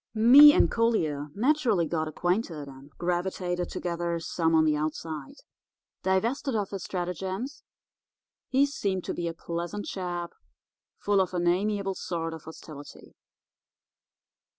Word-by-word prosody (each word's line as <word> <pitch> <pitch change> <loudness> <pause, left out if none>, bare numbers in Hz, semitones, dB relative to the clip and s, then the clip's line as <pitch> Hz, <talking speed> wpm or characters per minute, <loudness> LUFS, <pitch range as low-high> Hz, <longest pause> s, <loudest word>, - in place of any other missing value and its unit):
"Me 265 +7 +9
and - - +3
Collier 160 -11 0
naturally 245 - +2
got 160 -1 -2
acquainted, 175 -2 -2
and 135 +1 -13
gravitated 175 0 -2
together 170 -1 -2
some 165 0 0
on 160 0 +5
the 155 -1 +3
outside. 155 -1 -4 0.7
Divested 230 +8 0
of 205 -3 -1
his 195 -3 -5
stratagems, 190 - -4 0.9
he 270 +2 +4
seemed 195 -10 -2
to - - -3
be 175 - -3
a 165 - -3
pleasant 170 +5 -5
chap, 175 -2 -4 0.7
full 200 -1 +2
of 185 -1 -2
an 175 0 0
amiable 195 +2 +1
sort 165 -3 -4
of 160 -1 -10
hostility. 155 -2 -11
175 Hz, 130 wpm, -27 LUFS, 165-205 Hz, 0.9 s, Me